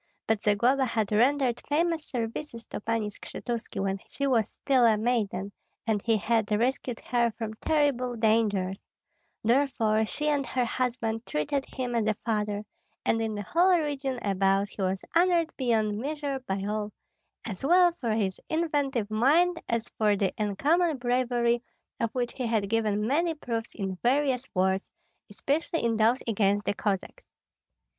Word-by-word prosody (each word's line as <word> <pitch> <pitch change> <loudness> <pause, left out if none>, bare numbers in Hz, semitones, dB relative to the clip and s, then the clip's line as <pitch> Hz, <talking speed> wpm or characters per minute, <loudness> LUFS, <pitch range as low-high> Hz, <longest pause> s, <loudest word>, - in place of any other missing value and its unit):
But 220 -2 +1
Zagloba 240 +6 +3
had 220 -4 -1
rendered 250 +2 +2
famous 325 +1 +1
services 235 0 -5
to - - -5
Pani 225 -1 -1
Skshetuski 225 -1 -5
when 195 0 -1
she 280 - -3
was 235 -6 +2
still 265 -3 +1
a 225 -2 +5
maiden, 210 -4 -1 0.3
and 215 -3 +1
he 225 -2 +3
had 220 0 0
rescued 240 +2 0
her 240 -1 +1
from 220 -2 -4
terrible 280 -5 +1
dangers; 215 -4 +1 0.6
therefore 230 -3 +2
she 300 +6 -3
and 290 -2 +2
her 250 -1 -1
husband 235 -2 -2
treated 265 - -1
him 250 -2 -4
as 225 -2 +1
a 215 - +2
father, 210 -2 -1 0.4
and 225 - +2
in 220 -1 -2
the 205 - -4
whole 355 - +4
region 280 -4 -2
about 195 0 +2
he 200 - -8
was 190 0 -1
honored 340 -1 +3
beyond 220 -5 +1
measure 285 +1 -3
by 195 0 -2
all, 210 0 -2 0.5
as 210 -2 -6
well 350 +4 +5
for 230 -3 0
his 200 -4 -1
inventive 285 -9 0
mind 330 +10 +3
as 230 0 -1
for 210 -2 +4
the 195 -2 0
uncommon 295 - +2
bravery 245 -1 +1 0.4
of 230 - 0
which 245 -1 -1
he 255 -3 -3
had 215 -3 0
given 215 -2 +1
many 320 +7 +1
proofs 230 -6 -4
in 190 -3 -3
various 260 0 +1
wars, 190 +1 +1 0.4
especially 295 +10 -1
in 230 -1 +2
those 225 +4 +3
against 205 -2 +1
the - - +1
Cossacks. 205 - -3
230 Hz, 155 wpm, -28 LUFS, 210-270 Hz, 0.6 s, a